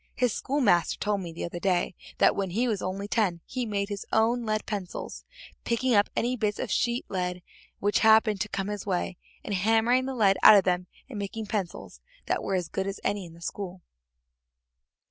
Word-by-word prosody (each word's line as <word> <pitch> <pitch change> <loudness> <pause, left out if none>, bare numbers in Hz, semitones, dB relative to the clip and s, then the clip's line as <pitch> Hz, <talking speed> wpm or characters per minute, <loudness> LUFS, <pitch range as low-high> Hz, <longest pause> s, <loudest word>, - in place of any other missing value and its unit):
His 250 -3 +1
schoolmaster 230 - +2
told 205 -1 -1
me 170 -2 -6
the 165 - -5
other 175 0 -5
day 180 -1 +1 0.2
that - - +4
when 195 -2 -1
he 230 +8 0
was 215 -5 -1
only 195 +2 -3
ten 205 -6 +1
he 250 -2 -3
made 200 -1 -2
his 200 -1 -4
own 230 +1 +2
lead 215 0 -1
pencils, 195 -4 -5 0.4
picking 240 +2 +1
up 205 -1 +4
any 245 +2 0
bits 210 -3 -1
of - - -4
sheet 240 0 0
lead 180 -2 -3 0.4
which 205 +1 +2
happened 220 -2 +5
to 210 - -2
come 200 0 -3
his 205 -1 -5
way, 180 -1 -1 0.3
and - - -4
hammering 225 +6 +3
the 265 - -3
lead 195 -5 +4
out - - +10
of 195 - +4
them 180 0 0 0.2
and 240 -6 -7
making 210 +2 -4
pencils 200 -4 -4 0.2
that - - 0
were 195 - -1
as 180 -3 -1
good 190 +3 -3
as 195 - -4
any 200 -2 -1
in 165 - -14
the 170 - -16
school." 180 0 -6
205 Hz, 205 wpm, -27 LUFS, 185-225 Hz, 0.4 s, out